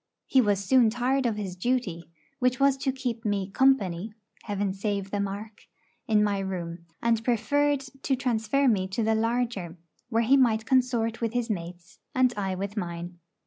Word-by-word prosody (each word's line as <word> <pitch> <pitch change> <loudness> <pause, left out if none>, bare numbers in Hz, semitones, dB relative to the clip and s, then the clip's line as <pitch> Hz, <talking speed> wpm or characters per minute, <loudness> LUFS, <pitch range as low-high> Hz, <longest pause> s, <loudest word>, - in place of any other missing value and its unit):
He 265 - +4
was 205 -3 +1
soon 250 0 +5
tired 250 +3 +1
of 225 - -1
his 195 -4 -5
duty, 185 -6 -2 0.3
which 250 +1 +1
was 275 -1 +4
to 270 0 0
keep 245 -3 -4
me 200 -3 -1
'company' 210 -6 +2 0.3
(Heaven 205 -2 -1
save 200 -1 -3
the 205 - -1
mark!) 200 +2 -5 0.4
in 215 -1 +4
my 205 -1 +1
room, 170 -3 -5 0.2
and 230 -1 +2
preferred 280 +5 +1 0.2
to 270 - +1
transfer 250 +2 +1
me 195 -6 +2
to 195 +4 -2
the 220 +1 +2
larger, 225 -6 -1 0.3
where 230 -1 +2
he 265 +5 +5
might 225 -4 +3
consort 240 -3 +1
with 230 -1 -1
his 245 -2 -1
mates, 175 0 -7 0.2
and 255 -1 +3
I 195 -2 -2
with 200 +2 -4
mine. 175 -2 -5
220 Hz, 175 wpm, -27 LUFS, 195-250 Hz, 0.4 s, soon